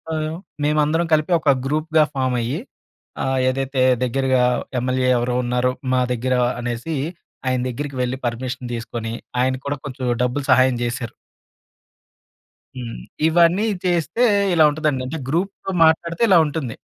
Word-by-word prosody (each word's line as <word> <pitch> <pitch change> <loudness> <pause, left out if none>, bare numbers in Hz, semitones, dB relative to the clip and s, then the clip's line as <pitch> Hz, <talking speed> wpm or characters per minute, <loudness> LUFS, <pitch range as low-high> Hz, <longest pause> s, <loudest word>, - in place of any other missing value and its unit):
ఆహ్, 155 0 -2 0.3
మేమందరం 150 +3 +2
కలిపి 155 +3 +2
ఒక 155 -2 +1 0.2
గ్రూప్‌గా 155 +2 +2
ఫామ్ 130 -2 0
అయ్యి 125 +7 -2 0.6
ఆహ్, 130 0 0
ఏదైతే 135 0 -1 0.2
దగ్గెరగా 130 0 +1 0.4
ఎమ్మెల్యే 130 +1 0
ఎవరో 120 +1 -1
ఉన్నారో 125 +1 +1 0.2
మా 130 - +3
దగ్గర 125 +2 -1 0.3
అనేసి 120 +6 -3 0.5
ఆయన 130 0 +1
దగ్గిరికి 140 +3 -5
వెళ్ళి 125 +1 -1
పర్మిషన్ 125 +1 -4
తీసుకొని 115 -1 -4 0.3
ఆయన 130 +1 +1
కూడా 140 +1 -1
కొంచెం 135 -3 -7 0.2
డబ్బులు 125 +3 -1
సహాయం 130 0 +5
చేశారు. 120 0 -3 1.6
హ్మ్. 120 -2 -6 0.3
ఇవన్నీ 170 +5 +4 0.2
చేస్తే 175 +6 +1 0.3
ఇలా 165 -2 +5
ఉంటదండి. 150 -3 -1
అంటే 160 +5 -4
గ్రూప్‌తో 190 +5 -2
మాట్లాడితే 170 +2 +1
ఇలా 185 - +7
ఉంటుంది. 145 -6 -4
135 Hz, 130 wpm, -21 LUFS, 125-155 Hz, 1.6 s, ఇలా